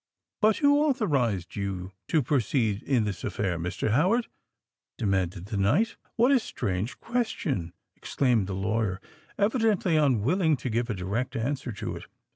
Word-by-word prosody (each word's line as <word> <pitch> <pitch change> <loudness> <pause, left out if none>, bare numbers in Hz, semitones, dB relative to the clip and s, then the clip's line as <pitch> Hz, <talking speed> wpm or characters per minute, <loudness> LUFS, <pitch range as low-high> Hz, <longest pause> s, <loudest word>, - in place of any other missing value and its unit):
"But 215 0 +4
who 285 -1 +4
authorised 145 - +1
you 95 -2 -4 0.2
to 155 -3 +2
proceed 120 -5 +1
in 130 -4 +1
this 100 -4 -4
affair, 90 -4 -1
Mr. 90 +5 -2
Howard?" 190 - +3 0.7
demanded 95 -3 -1
the 105 0 -4
knight. 130 - +2 0.2
"What 240 +4 +4
a 270 - +5
strange 100 - -3
question?" 195 - -2 0.2
exclaimed 120 -8 +1
the 95 - -3
lawyer, 105 0 -1 0.4
evidently 210 -6 +2
unwilling 150 - +2
to 125 - -4
give 120 +2 0
a 110 - -1
direct 100 +7 -3
answer 130 +2 -2
to 100 - -5
it. - - -10
120 Hz, 145 wpm, -27 LUFS, -, 0.7 s, a